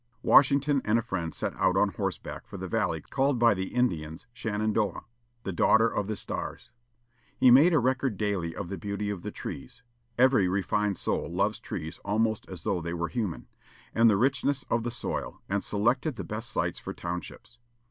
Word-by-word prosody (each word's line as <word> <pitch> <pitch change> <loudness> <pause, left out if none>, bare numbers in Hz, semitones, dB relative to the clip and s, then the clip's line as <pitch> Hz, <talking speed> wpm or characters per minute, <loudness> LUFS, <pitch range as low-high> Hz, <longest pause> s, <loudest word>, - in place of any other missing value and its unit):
Washington 140 0 +5
and 110 +2 +2
a 115 - 0
friend 90 -8 -3
set - - -3
out - - +2
on - - +4
horseback - - -4
for - - -8
the - - -5
valley - - 0
called 135 -1 0
by 115 -1 +5
the 95 -1 -3
Indians 80 -8 -1
Shenandoah, 110 -2 -1 0.4
"the 95 - -3
daughter 110 +6 +4
of 105 -3 -2
the 110 - -2
stars." 115 +3 -6 0.7
He 125 - +6
made 145 +8 +7
a 160 - +4
record 130 -3 +1
daily 95 -5 -1
of 100 - -5
the 100 - -5
beauty 105 0 -3
of 100 -4 -5
the - - -5
trees 115 - -8 0.3
every 125 -6 +5
refined 100 +2 0
soul - - -2
loves - - 0
trees 80 +2 -6
almost 110 +1 0
as 95 -2 -7
though 90 -3 0
they 85 +1 -3
were 85 0 -2
human 105 -9 -3 0.5
and 115 0 +5
the 105 - +4
richness 135 +3 +1
of 115 - +2
the 120 - -2
soil, 120 - -5
and 100 +1 -1
selected 125 +8 +1
the - - -5
best 110 +2 -5
sites - - -1
for - - -7
townships. 90 +6 -6
110 Hz, 190 wpm, -28 LUFS, 95-125 Hz, 0.7 s, made